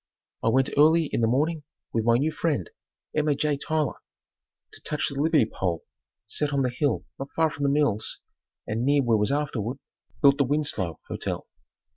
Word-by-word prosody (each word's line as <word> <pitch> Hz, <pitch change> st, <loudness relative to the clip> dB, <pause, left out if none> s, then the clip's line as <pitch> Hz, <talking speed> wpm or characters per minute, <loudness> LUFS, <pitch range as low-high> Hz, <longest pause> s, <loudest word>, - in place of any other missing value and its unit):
I -, -, -1 dB
went 130 Hz, +3 st, +3 dB
early 160 Hz, +1 st, +5 dB
in -, -, +1 dB
the 115 Hz, -, +3 dB
morning 150 Hz, +7 st, +1 dB, 0.3 s
with 115 Hz, -1 st, 0 dB
my 115 Hz, 0 st, +5 dB
new 150 Hz, +5 st, +1 dB
friend, 150 Hz, -, -1 dB, 0.5 s
Emma 150 Hz, -1 st, +2 dB
J. 150 Hz, +1 st, +1 dB
Tyler, 150 Hz, -1 st, -1 dB, 0.7 s
to -, -, -11 dB
touch 150 Hz, -, -1 dB
the 140 Hz, -1 st, -3 dB
Liberty 155 Hz, -5 st, +4 dB
pole 90 Hz, -6 st, -3 dB, 0.4 s
set 145 Hz, +7 st, -1 dB
up 145 Hz, -, -2 dB
on 140 Hz, -, +2 dB
the 125 Hz, -, 0 dB
hill 130 Hz, -1 st, 0 dB
not 135 Hz, +1 st, -5 dB
far 160 Hz, -1 st, +3 dB
from 145 Hz, -, -8 dB
the 140 Hz, -, +3 dB
mills 140 Hz, -7 st, +1 dB, 0.5 s
and 110 Hz, +2 st, -2 dB
near 140 Hz, +1 st, +3 dB
where 120 Hz, -2 st, +3 dB
was 105 Hz, +4 st, +1 dB
afterward 135 Hz, -4 st, -1 dB, 0.4 s
built 140 Hz, 0 st, +5 dB
the -, -, +5 dB
Winslow 130 Hz, -, -1 dB
Hotel. -, -, -4 dB
140 Hz, 185 wpm, -26 LUFS, 115-150 Hz, 0.7 s, early